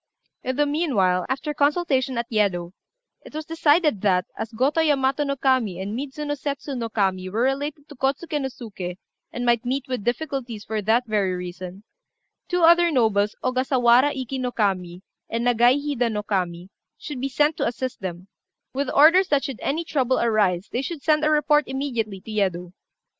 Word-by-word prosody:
In 260 0 -2
the 295 +2 +2
meanwhile, 230 - +1
after 275 +3 -2
consultation 285 -4 +1
at 235 - -1
Yedo, 190 -5 0 0.5
it - - -13
was 310 0 -4
decided 310 - +2
that, 185 -3 +2
as 225 - -5
Gotô 275 +8 +1
Yamato 275 -1 +2
no 280 -1 -1
Kami 255 -9 +1
and 200 +3 -4
Midzuno 290 +3 -4
Setsu 280 0 -4
no 235 -3 -3
Kami 190 -4 0
were 220 +5 0
related 285 +3 -2
to 295 - -12
Kôtsuké 285 +4 -1
no 265 - -1
Suké, 195 -8 -7 0.3
and 245 0 -4
might 240 -1 +2
meet 260 +2 -2
with 255 -5 -3
difficulties 240 -3 -3
for 220 0 -2
that 225 +5 +2
very 205 -5 0
reason, 180 +2 -7 0.6
two 355 -1 0
other 340 +1 +6
nobles, 220 -7 +2
Ogasawara 255 +1 +3
Iki 265 0 -4
no 250 -1 -2
Kami 185 -5 -1 0.3
and 230 +1 -2
Nagai 245 +2 +4
Hida 275 -5 -1
no 210 -1 -3
Kami, 180 -3 -2 0.3
should 285 -5 -7
be 275 - -1
sent 295 +3 +2
to - - 0
assist 250 0 -4
them, 180 0 -6 0.5
with 275 0 -1
orders 335 +6 +6
that 285 -2 +2
should 270 -4 -5
any 315 +5 -1
trouble 260 -5 0
arise 205 -5 +1
they 245 - -1
should 290 +1 -6
send 305 -1 +3
a 305 - +3
report 300 0 +3
immediately 240 -7 -3
to 220 - -10
Yedo. 180 -4 -1
255 Hz, 180 wpm, -23 LUFS, 210-285 Hz, 0.6 s, other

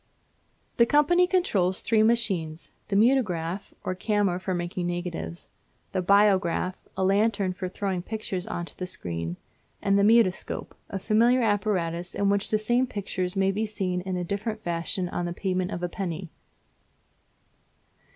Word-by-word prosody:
The 235 - +5
company 345 +6 +4
controls 200 - +1
three 220 0 +3
machines, 195 -9 0 0.2
the 200 - -1
Mutograph, 200 -6 +1
or 185 - -1
camera 195 -1 0
for 185 0 -2
making 175 0 -3
negatives; 175 - -4 0.4
the 185 - 0
Biograph, 190 -2 +3 0.2
or 190 - +1
lantern 200 -1 +2
for 185 0 -4
throwing 190 -1 -2
pictures 195 -2 -4
on 175 - -3
to - - -9
the 185 - -3
screen; 85 - -4 0.4
and 200 0 +2
the - - +4
Mutoscope, 215 -3 +2 0.2
a 195 - -3
familiar 235 +5 +3
apparatus 180 -5 0
in 200 0 +2
which 200 0 +1
the 215 - +3
same 240 +4 +1
pictures 185 -4 -3
may 195 0 +3
be 215 +3 -1
seen 185 -4 -2
in 185 0 -3
a 180 - -2
different 215 +4 -3
fashion 175 +1 -2
on 175 0 -3
the 175 - -3
payment 185 0 -1
of 175 -3 -5
a - - +1
penny. 175 -1 -5
190 Hz, 155 wpm, -26 LUFS, 180-215 Hz, 0.4 s, The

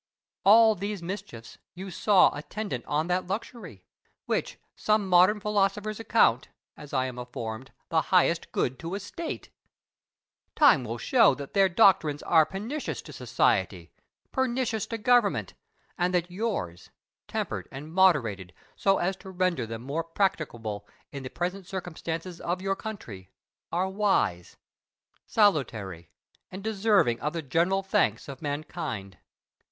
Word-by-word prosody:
All 220 +2 +7
these 200 -1 -5
mischiefs 180 - -7 0.2
you 190 +1 -7
saw 200 0 +4
attendant 150 - -5
on 150 +2 0
that 180 +1 -1
luxury, 190 - -6 0.4
which - - -2 0.2
some 215 -2 +1
modern 185 +4 +5
philosophers 210 +1 0
account 180 - +3 0.3
(as 145 - -12
I 130 -2 +1
am 125 -1 -6
informed) 120 0 -6 0.2
the 160 -1 +3
highest 170 -2 +2
good 125 +1 -1
to 170 +3 -4
a - - -3
state! 315 - -6 1.0
Time 260 - +6
will 115 0 -4
show 230 - +4
that 140 0 -9
their 195 -1 +4
doctrines 170 -6 +4
are 160 -3 +4
pernicious 230 +10 -4
to - - -11
society, - - 0 0.4
pernicious 250 -4 -1
to 230 - -4
government; 235 -1 +2 0.5
and 180 +1 +1
that 175 0 0
yours, 180 - -3 0.4
tempered - - -3
and 150 +4 -9
moderated 115 - +2 0.2
so 195 0 +2
as 190 +2 0
to 190 - -11
render 180 -9 0
them 115 +1 -6
more 145 +5 -2
practicable 130 - -2 0.2
in 140 - -6
the 130 - -6
present 180 +4 -4
circumstances 175 -2 -5
of 175 +2 -2
your 195 +1 -1
country, 125 - -8 0.4
are 180 +2 0
wise, 190 - 0 0.7
salutary, 110 - +1 0.4
and 190 +1 -8
deserving 205 - +2
of 150 +2 -2
the 165 -1 -4
general 175 +8 +1
thanks 115 - +1
of 135 -2 -9
mankind. 145 - -5
180 Hz, 135 wpm, -27 LUFS, 135-200 Hz, 1.0 s, All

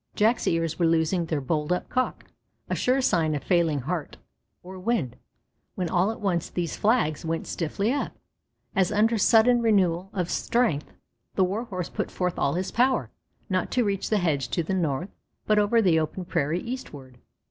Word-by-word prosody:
Jack's 225 +3 +2
ears 165 0 0
were 170 - +4
losing 165 +1 +1
their 155 -2 -1
bold 150 +4 -1
up 180 - 0
cock, 255 0 -2 0.4
a - - -2
sure 255 +2 +2
sign 160 -10 +2
of 145 - -4
failing 165 -6 +2
heart 160 +3 -4 0.5
or 185 +1 -9
wind, 185 - -1 0.6
when 180 -3 -2
all 180 +3 +3
at 225 - -5
once 180 -5 -1
these 175 -3 -3
flags 210 - +1
went 165 0 -2
stiffly 200 - -1
up, 285 - -2 0.6
as 190 -1 +2
under 220 +2 +2
sudden 235 +3 +5
renewal 190 -5 +2
of 180 -4 -2
strength. 230 -12 0 0.4
The 190 - +3
Warhorse 190 -2 -3
put - - -3
forth 180 -1 -2
all 140 - +1
his 185 +1 -2
power, 245 - +1 0.4
not 185 -1 -1
to 250 - +3
reach 200 -3 -1
the 215 - +2
hedge 150 -9 0
to 170 - -1
the 180 - -3
north, 170 -1 -1 0.4
but 215 0 +3
over 220 +2 +3
the 170 -4 +4
open 160 +4 -3
prairie 160 +2 -1
eastward. 145 - -8
180 Hz, 180 wpm, -26 LUFS, 160-215 Hz, 0.6 s, sudden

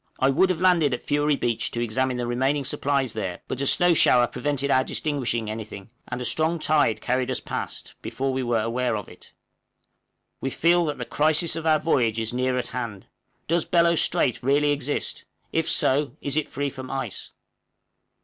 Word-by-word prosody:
I 135 +1 +3
would 185 +8 +3
have 180 -3 -1
landed 170 -7 +3
at - - -11
Fury 145 0 +1
Beach 120 -4 -1
to 120 - -4
examine 125 +2 0
the 120 - -2
remaining 135 +4 0
supplies 140 -3 0
there, 95 -5 -4
but 130 - -4
a 140 - +1
snow 175 +4 +5
shower 125 -6 +5
prevented 140 +2 -2
our 130 - +4
distinguishing 130 -7 -2
anything, 110 -1 -7 0.2
and - - -4
a 125 - -4
strong 160 +7 +1
tide 150 -7 +2
carried 125 0 0
us - - -1
past - - -6
before 135 0 -3
we 130 - -1
were 120 -3 0
aware 120 0 -1
of 105 - -7
it. - - -15 1.1
We 135 - -2
feel 170 +5 +3
that 150 -2 -3
the - - -5
crisis 155 +2 +1
of 165 0 -3
our 155 -1 +5
voyage 120 -8 +1
is 110 +1 -3
near 125 +1 0
at 125 -2 -3
hand. 115 -6 -5 0.4
Does 170 +1 +1
Bellot 170 -1 +3
Strait 120 - +1
really 145 +3 +2
exist? 145 0 -3 0.3
if 160 0 0
so, 140 +2 +2
is 140 0 -2
it 155 - -1
free 140 +1 -3
from 130 -1 -8
ice? 135 - -4
135 Hz, 190 wpm, -24 LUFS, 120-150 Hz, 1.1 s, snow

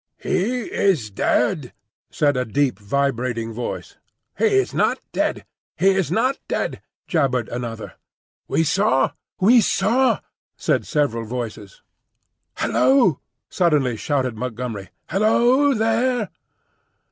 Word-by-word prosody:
"He 210 +7 -1
is 160 - 0
dead," - - 0 0.4
said 145 -2 +1
a 125 - +1
deep, 125 -2 0
vibrating 120 0 -1
voice. 120 +2 -6 0.4
"He - - +1
is 400 -2 +2
not - - +2
dead; - - -1 0.3
he 195 - +4
is 190 -4 0
not 255 +8 +1
dead," - - -2 0.3
jabbered 135 - +1
another. 120 -2 -5 0.5
"We 165 - +1
saw, 145 -6 +2 0.3
we 230 +5 +6
saw," 230 +7 +2 0.4
said - - 0
several 120 -7 0
voices. 125 - -6 0.7
"Hul - - -2
lo!" 245 - +4 0.3
suddenly 150 -9 +2
shouted 130 0 -1
Montgomery, 115 -4 -5 0.2
"Hullo, 240 +7 +3
there!" 225 0 +1
145 Hz, 110 wpm, -22 LUFS, -, 0.7 s, we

